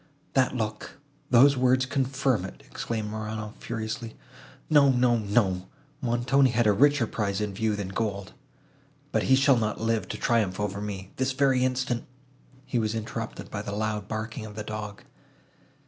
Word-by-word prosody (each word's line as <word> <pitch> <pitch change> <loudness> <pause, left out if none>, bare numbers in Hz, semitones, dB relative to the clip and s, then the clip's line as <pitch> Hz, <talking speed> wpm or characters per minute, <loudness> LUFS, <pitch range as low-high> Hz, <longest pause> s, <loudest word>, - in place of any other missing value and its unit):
"That 130 -1 +2
look, 110 +3 -4 0.3
those 135 +3 +7
words 130 0 +3
confirm 135 -4 0
it," 95 - -9
exclaimed 110 -2 -4
Morano, 110 0 -5
furiously. 115 0 -5 0.5
"No, 145 -2 +6
no, 125 -2 +3
no, 100 -3 +1 0.3
Montoni 130 +2 +3
had 120 -1 +2
a 105 - +5
richer 145 +3 +4
prize 100 -3 -2
in 105 -2 -2
view, 110 +1 0
than 100 -2 -4
gold. 100 -1 -3 0.8
But - - +2
he 130 - +7
shall 135 -1 +5
not 110 -2 -1
live 110 -3 0
to 105 - -5
triumph 105 -5 +1
over 100 -1 -2
me!—This 105 +6 -3
very 130 -2 +3
instant—" 125 -2 -1 0.6
He 120 - 0
was 110 0 -1
interrupted 115 0 -5
by 100 - -3
the 100 -1 -5
loud 105 -1 -2
barking 110 +1 -4
of 105 - -11
the 105 - -4
dog. 105 -1 -6
110 Hz, 160 wpm, -27 LUFS, 105-125 Hz, 0.8 s, those